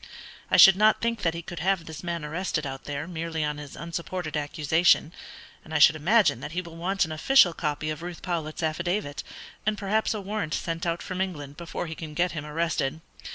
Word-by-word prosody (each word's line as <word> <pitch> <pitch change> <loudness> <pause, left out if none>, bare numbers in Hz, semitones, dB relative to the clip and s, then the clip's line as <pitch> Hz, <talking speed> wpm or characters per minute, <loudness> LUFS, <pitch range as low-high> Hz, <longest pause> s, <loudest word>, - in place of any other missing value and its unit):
I - - +4
should 190 -1 +9
not 215 +1 +5
think 230 -2 -1
that 165 -1 +1
he 170 - -5
could 175 +1 -7
have 185 0 +1
this 160 +1 -8
man 170 -3 -3
arrested 160 0 -2
out 135 -1 -6
there 145 +1 -4
merely 165 -2 -3
on 150 0 -2
his 145 -2 -9
unsupported 170 0 -5
accusation, 155 +2 +2 0.5
and 160 - -8
I - - +5
should 150 +1 +7
imagine 185 - +3
that 150 - -7
he 180 - -1
will 170 -1 -11
want 185 +3 0
an 160 - -8
official 175 - +5
copy 150 -1 -2
of 155 +1 -6
Ruth 175 -1 -7
Powlett's 165 -2 -3
affidavit, 160 -1 -1 0.4
and 215 0 0
perhaps 215 +3 0
a - - -3
warrant 200 -5 -2
sent 165 0 -3
out 170 0 -1
from 185 -1 -4
England, 145 -7 -4
before 170 +1 -5
he 160 - -5
can 155 -2 -8
get 175 +2 +1
him 155 -2 -5
arrested. 155 -1 -1
165 Hz, 210 wpm, -26 LUFS, 155-180 Hz, 0.5 s, should